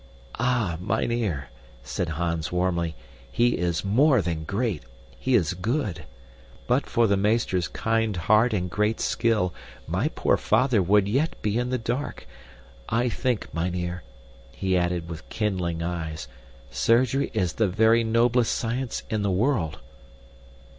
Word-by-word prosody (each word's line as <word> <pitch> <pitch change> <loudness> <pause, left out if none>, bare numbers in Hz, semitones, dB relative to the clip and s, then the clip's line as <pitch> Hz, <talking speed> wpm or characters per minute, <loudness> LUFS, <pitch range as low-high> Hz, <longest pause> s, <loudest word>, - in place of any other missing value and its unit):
"Ah, 115 -8 +1
mynheer," 110 - -1 0.3
said 70 +7 -3
Hans 85 0 -2
warmly, 85 -2 0 0.4
"he 120 - +2
is 85 0 -1
more 130 +6 +4
than 85 -4 -2
great. 100 - -1 0.4
He 130 -1 +1
is 90 -5 +2
good. 95 - -2 0.6
But - - +1
for 120 - +2
the 100 -2 +3
meester's 100 -4 +1
kind 115 -3 0
heart 110 +7 +4
and 90 -4 -1
great 105 +4 0
skill 110 -6 +1 0.3
my - - 0
poor - - +1
father 115 -1 +2
would 100 +2 +3
yet 140 +10 0
be 105 +2 +1
in 125 0 -1
the 130 - 0
dark. 120 +4 -4 0.6
I 120 +2 +1
think, 125 -1 -2
mynheer," 90 +1 -2 0.5
he 95 +5 -1
added 85 -1 0
with 80 -1 -8
kindling 90 -6 -1
eyes, 80 -3 -4 0.4
"surgery 130 +4 +2
is 90 -3 0
the 110 - +2
very 110 +4 +4
noblest 115 +1 +2
science 120 +1 -2
in 110 -2 -1
the 100 - 0
world!" 95 - +1
105 Hz, 140 wpm, -25 LUFS, 90-115 Hz, 0.6 s, more